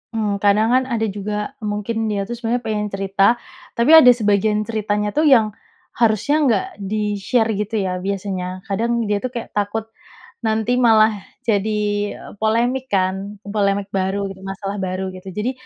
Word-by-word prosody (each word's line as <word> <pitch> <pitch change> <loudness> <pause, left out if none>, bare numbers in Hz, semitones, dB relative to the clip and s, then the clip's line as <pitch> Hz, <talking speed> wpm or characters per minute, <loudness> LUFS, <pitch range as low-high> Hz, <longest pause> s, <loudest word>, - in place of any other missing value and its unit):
Mmm. 210 -2 -1
Kadang, 210 +2 +3
kan, 255 +1 +4
ada 235 -3 -1
juga 210 +3 -4
mungkin 215 +1 -2
dia, 205 -2 -1
tuh, 240 +4 -5
sebenarnya 240 +1 -2
pengen 210 -2 -2
cerita, 195 +3 +2 0.4
tapi 235 +6 +3
ada 320 -5 +9
sebagian 210 -1 +1
ceritanya, 210 -1 -1
tuh, 305 +1 +2
yang 225 -6 +5 0.5
harusnya 230 +6 +2
nggak 215 -6 +2
di-share, 210 +3 0
gitu, 210 +2 -3
ya, 180 -1 -2
biasanya. 185 -1 -4
Kadang 230 +4 -1
dia, 205 -1 0
tuh, 255 +3 -4
kayak 235 - -5
takut 205 +2 -1 0.6
nanti 220 +2 +1
malah 225 -2 +5 0.3
jadi 215 -2 0 0.6
polemik, 240 +4 +1
kan, 190 +2 0
polemik 200 -1 -1
baru, 195 +1 -1
masalah 195 +1 -5
baru, 190 0 -3
gitu. 185 +1 -12
Jadi 210 +6 -1
210 Hz, 150 wpm, -20 LUFS, 200-225 Hz, 0.6 s, ada